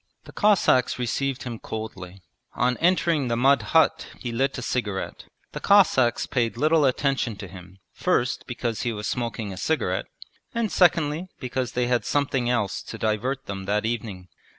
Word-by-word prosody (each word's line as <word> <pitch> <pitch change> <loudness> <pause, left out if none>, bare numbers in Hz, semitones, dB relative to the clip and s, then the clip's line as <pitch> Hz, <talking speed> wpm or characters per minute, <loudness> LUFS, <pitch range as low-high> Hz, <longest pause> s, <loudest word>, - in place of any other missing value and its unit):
The - - -12
Cossacks 195 -11 +3
received 130 +3 -2
him 120 -4 -6
coldly. 95 -4 -7 0.3
On 125 +1 +2
entering 165 -5 +2
the 115 -1 0
mud 135 +3 +4
hut 160 -1 +2
he 120 - -4
lit 135 +5 0
a 125 - -5
cigarette. 105 -6 -3 0.3
The - - -5
Cossacks 160 -12 +4
paid 115 -3 -1
little 155 +2 +3
attention 135 -3 0
to 95 0 -8
him, 90 +1 -12 0.2
first 130 -9 0
because 120 -2 -3
he 120 - -1
was 105 -1 -5
smoking 115 -4 -3
a - - -9
cigarette, 160 +10 -1 0.5
and 230 -3 0
secondly 170 -1 +2
because 125 0 -3
they 125 0 +1
had 120 0 +1
something 135 -4 0
else 115 -6 0
to - - -8
divert 125 +5 -1
them 95 -1 -6
that 105 +2 0
evening. 105 -5 -4
125 Hz, 165 wpm, -25 LUFS, 110-140 Hz, 0.5 s, mud